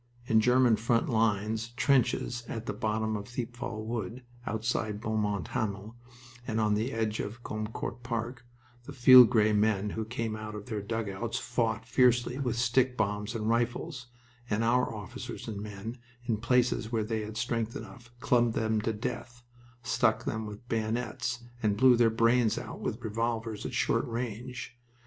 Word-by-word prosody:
In 110 -2 +4
German 125 -1 +4
front 115 +1 +1
line 110 -2 +1 0.2
trenches 125 -2 +2
at 115 0 -5
the - - -2
bottom 110 0 -1
of 105 -1 -5
Thiepval 120 -3 -5
Wood, 115 +1 -4 0.2
outside 110 -2 -1
Beaumont 105 -3 -1
Hamel 105 +1 -3 0.5
and 110 -1 -1
on 105 -1 +2
the 110 +5 0
edge 110 -2 -1
of 115 +4 -5
Gommecourt 110 +3 -4
Park, 120 +1 -4 0.4
the 145 - -8
field 125 -2 +9
gray 110 -3 +3
men 105 -1 +2
who 110 - -3
came 115 0 -3
out 110 0 -6
of 105 -1 -7
their 110 -4 -3
dugouts 115 +1 -3
fought 120 -3 -1
fiercely 125 +1 +3
with 125 -4 -1
stick 125 +1 +2
bombs 105 +1 -1
and 110 -1 -2
rifles, 120 +4 -1 0.4
and 110 +2 +1
our 125 +2 +2
officers 105 -3 -7
and 105 -3 -4
men, 105 +3 -7 0.3
in 115 -3 0
places 120 0 +1
where 115 -2 +1
they 110 0 -2
had 105 +1 -6
strength 115 -2 -1
enough, 110 +3 -9
clubbed 120 -4 +2
them 110 -1 +1
to 115 +1 -1
death, 120 +2 -5 0.4
stuck 110 -2 +1
them 110 0 -2
with 105 +3 -10
bayonets, 115 +2 -2 0.2
and 105 -2 +1
blew 130 +1 +7
their 115 -1 +4
brains 115 0 +3
out - - -6
with 120 +3 -4
revolvers 115 0 -2
at - - -6
short - - +1
range. 120 +1 -5
115 Hz, 165 wpm, -30 LUFS, 110-120 Hz, 0.5 s, field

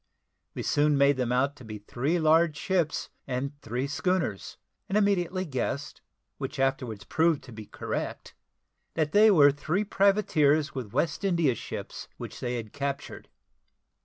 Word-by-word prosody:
We - - -4
soon 145 0 +2
made 140 0 +4
them 125 -2 -1
out 135 +3 +1
to 130 - -12
be 110 -2 -7
three 130 +10 -1
large 160 -1 +3
ships 175 -5 -1 0.2
and 130 +1 -2
three 120 +4 -2
schooners; 145 - -2 0.3
and 195 - +1
immediately 190 -3 +1
guessed, 140 0 -3 0.4
which 135 0 -5
afterwards 130 -6 -1
proved 160 -2 +1
to 125 - -12
be 110 -2 -9
correct, - - -5 0.6
that 155 -2 0
they 215 +4 +6
were 145 -8 +7
three 155 +8 -1
privateers, 155 -8 +2
with 125 -6 -5
West 160 - -1
India 170 -8 +2
ships - - -7
which - - -8
they 125 0 -2
had 110 -3 -6
captured. 140 0 -5
145 Hz, 150 wpm, -28 LUFS, 130-170 Hz, 0.6 s, were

